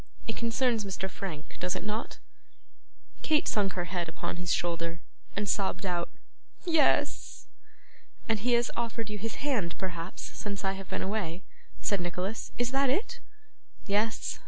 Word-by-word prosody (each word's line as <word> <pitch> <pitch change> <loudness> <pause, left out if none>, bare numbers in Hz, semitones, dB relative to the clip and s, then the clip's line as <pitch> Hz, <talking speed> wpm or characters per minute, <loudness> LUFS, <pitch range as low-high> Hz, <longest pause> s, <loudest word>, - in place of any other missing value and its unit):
It 225 - -2
concerns 235 -1 +2
Mr. 190 -1 -2
Frank, 180 -5 -6
does 180 0 +1
it - - -2
not?' 210 +2 -2 1.0
Kate 310 +1 +3
sunk 200 -3 +2
her 175 - 0
head 175 -1 -1
upon 165 - -3
his 175 -1 -1
shoulder, 170 -1 +1 0.4
and 205 +1 0
sobbed 195 -1 +1
out 175 -2 +1 0.6
'Yes.' 325 -3 +3 0.8
'And 225 -2 +3
he 245 +4 +3
has 235 0 +4
offered 230 -2 -1
you 210 - -3
his 225 +3 -2
hand, 215 -12 +2
perhaps, 175 -1 -4
since 200 -1 -4
I 195 - +4
have 195 -1 -6
been 190 - -1
away,' 190 -3 -1 0.4
said 200 -4 +2
Nicholas; 180 +5 -2
'is 245 0 +2
that 270 0 +4
it? 475 - +1 0.7
Yes. 210 +2 +1
200 Hz, 155 wpm, -31 LUFS, 180-230 Hz, 1.0 s, has